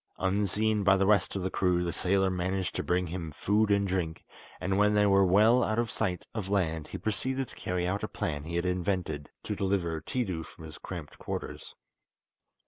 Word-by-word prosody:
Unseen 105 +2 +1
by 95 0 +5
the 95 - +2
rest 100 -5 +3
of 95 - -2
the 95 - -1
crew 90 -2 +2
the 85 -1 -2
sailor 95 +1 +2
managed 95 +1 -1
to - - -1
bring 90 +1 +1
him 85 -2 -5
food 105 +7 +1
and 100 -1 +3
drink, 90 -4 -2 0.3
and 95 +1 0
when 105 0 +4
they 105 0 +5
were 100 -1 +5
well 105 +7 +5
out 110 - 0
of 115 -1 0
sight 90 -5 -1
of 105 -4 -4
land 80 -6 0
he - - -6
proceeded 130 +5 -2
to - - -13
carry 90 -1 -2
out 100 +3 -1
a - - -2
plan 75 -2 -3
he 85 +2 -5
had 85 +1 0
invented 90 -5 -1
to 105 - -3
deliver 95 -5 0
Tiidu 95 -10 -2
from 80 - -12
his 80 -1 -10
cramped 85 -6 -8
quarters. - - -6
95 Hz, 205 wpm, -29 LUFS, 90-100 Hz, 0.3 s, by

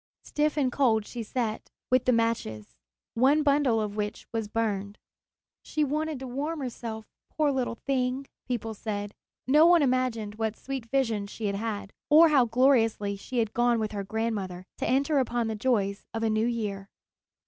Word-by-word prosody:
Stiff 300 0 0
and 265 -4 +2
cold 230 -6 +2
she 240 - -6
sat, 225 -1 -3 0.2
with 255 0 +3
the 255 - +4
matches, 225 - -1 0.4
one 275 +6 +4
bundle 280 -5 +3
of 210 -1 -3
which 210 -1 -3
was 225 -2 -2
burned. 205 -2 -2 0.6
"She 305 - -1
wanted 305 +1 -1
to 265 - -5
warm 295 +6 -3
herself, 230 -3 -5 0.2
poor 300 -2 +1
little 255 -3 -1
thing," 260 0 0 0.2
people 230 -3 -2
said. 205 -1 -4 0.3
No 300 +5 +6
one 345 -3 +6
imagined 240 -5 0
what 220 -1 -1
sweet 265 -4 -5
visions 225 -6 0
she 220 - -6
had 200 -1 0
had, 205 -2 -4 0.2
or 320 +2 +8
how 275 -5 +5
gloriously 225 -4 +2
she 245 +6 -6
had 225 -2 0
gone 240 0 +3
with 215 -1 -2
her 200 -2 -3
grandmother 200 -4 -3
to - - -1
enter 275 +3 +2
upon 240 -2 0
the 220 -1 -2
joys 205 -4 0
of 225 - -2
a 225 - +2
new 215 +2 +1
year. 205 -4 -3
230 Hz, 175 wpm, -28 LUFS, 215-265 Hz, 0.6 s, or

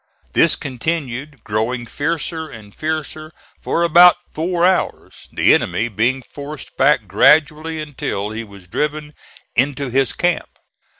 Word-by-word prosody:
This 165 - +4
continued, 140 -1 -4
growing 115 +3 -2
fiercer 160 +4 -3
and 105 -5 -12
fiercer, 155 0 -4 0.3
for 170 - 0
about 175 +1 +7 0.2
four 170 +2 0
hours, 185 0 -1
the - - +4
enemy 120 +2 0
being 125 +5 0
forced 145 +1 -9
back 135 -5 +3
gradually 155 - +3
until 130 -9 -4
he 110 +1 -5
was 100 -4 -14
driven 150 - -3 0.4
into 135 +1 0
his 135 0 +2
camp. 175 0 -1
145 Hz, 125 wpm, -19 LUFS, 120-160 Hz, 0.4 s, about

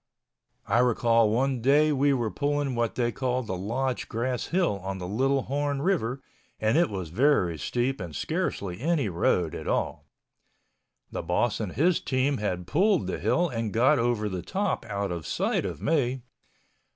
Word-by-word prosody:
I 115 +3 +2
recall 115 -2 +3
one 130 +3 0
day 145 +5 +4
we 140 0 +3
were 120 -5 0
pulling 145 -2 -1
what 120 -2 -1
they 120 -1 +1
called 125 0 -1
the 95 - -3
Lodge 120 +7 -2
Grass 120 +2 -2
Hill 170 - +1
on 95 +1 -4
the 90 -1 -5
Little 135 +6 +1
Horn 145 0 -1
River 135 -9 0 0.4
and 110 +1 +1
it 170 -3 +4
was 95 -5 -5
very 100 - +2
steep 125 - -1
and 85 -5 -7
scarcely 90 +5 -2
any 150 -7 +1
road 85 -2 +1
at - - -6
all. - - -1 1.0
The - - -3
boss 90 +7 0
and 105 -5 -4
his 165 +7 +2
team 130 0 0
had 90 -4 -2
pulled 185 - +2
the - - -3
hill 175 +1 +2
and 115 -6 -3
got 125 +6 +4
over 115 -3 +1
the 95 -3 -3
top 195 - -2
out 100 -1 -2
of 85 -4 -5
sight - - 0
of - - -5
me. 135 -5 +1
120 Hz, 175 wpm, -27 LUFS, 105-140 Hz, 1.0 s, day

